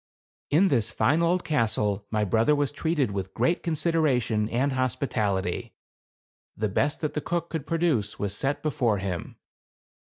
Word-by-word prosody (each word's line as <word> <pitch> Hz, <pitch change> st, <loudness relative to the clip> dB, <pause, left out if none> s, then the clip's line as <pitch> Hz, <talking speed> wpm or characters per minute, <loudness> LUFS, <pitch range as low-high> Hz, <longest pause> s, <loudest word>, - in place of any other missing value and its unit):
In 180 Hz, +7 st, +4 dB
this 120 Hz, -6 st, +2 dB
fine 145 Hz, +6 st, +2 dB
old 175 Hz, +2 st, +2 dB
castle 105 Hz, -7 st, 0 dB
my 105 Hz, -1 st, 0 dB
brother 110 Hz, +8 st, +3 dB
was 145 Hz, -1 st, 0 dB
treated 150 Hz, -6 st, 0 dB
with 95 Hz, -1 st, -5 dB
great 170 Hz, +1 st, +1 dB
consideration 145 Hz, -10 st, +1 dB
and 130 Hz, +5 st, +1 dB
hospitality; 110 Hz, -8 st, -1 dB, 0.8 s
the 110 Hz, 0 st, 0 dB
best 145 Hz, +10 st, 0 dB
that 155 Hz, -, -2 dB
the 150 Hz, -, -2 dB
cook 170 Hz, +2 st, -2 dB
could 160 Hz, -4 st, -4 dB
produce 160 Hz, -12 st, 0 dB
was 100 Hz, -1 st, -2 dB
set 135 Hz, +5 st, -2 dB
before 130 Hz, -8 st, +1 dB
him. 95 Hz, -3 st, -4 dB
130 Hz, 150 wpm, -26 LUFS, 105-155 Hz, 0.8 s, In